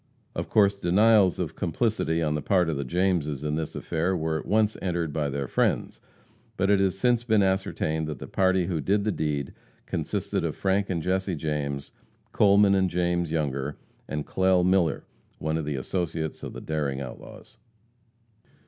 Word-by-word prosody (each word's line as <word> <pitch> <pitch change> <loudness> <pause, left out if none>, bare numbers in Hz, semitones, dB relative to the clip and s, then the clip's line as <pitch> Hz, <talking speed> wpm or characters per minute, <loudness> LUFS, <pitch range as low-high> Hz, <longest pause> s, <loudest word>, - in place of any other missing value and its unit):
Of - - -4
course, 100 -2 +4
denials 100 +1 +4
of - - -3
complicity 85 -3 0
on 75 -1 0
the 75 - -2
part 90 -2 +2
of 80 - -1
the 70 - -2
Jameses 80 -2 0
in 75 0 -1
this 80 -1 -4
affair 90 +4 -1
were 80 0 -1
at - - -9
once 110 0 +2
entered 85 -4 -2
by 75 -2 -1
their 70 -1 -3
friends. - - 0 0.6
But 100 +1 +2
it 100 - +4
has 95 -1 +1
since 120 +2 +2
been 110 -4 +3
ascertained 95 -5 0
that 75 - -4
the - - -8
party 95 -1 +2
who 85 -4 -2
did 100 +5 +1
the 105 - +1
deed 75 -5 -2 0.3
consisted - - -2
of - - -2
Frank 100 +1 0
and 85 -4 -1
Jesse 95 +1 0
James, 70 -2 -3 0.4
Coleman 100 0 +5
and 95 -1 +2
James 85 -1 0
Younger, 75 -3 -2 0.3
and 75 -1 -3
Clell 95 -1 +2
Miller, 90 -3 +2 0.3
one 80 0 -2
of 80 -2 -2
the 75 -1 -2
associates 80 +2 -3
of - - -6
the - - -8
daring 75 -4 -2
outlaws. 65 -3 -10
85 Hz, 175 wpm, -26 LUFS, 75-95 Hz, 0.6 s, Coleman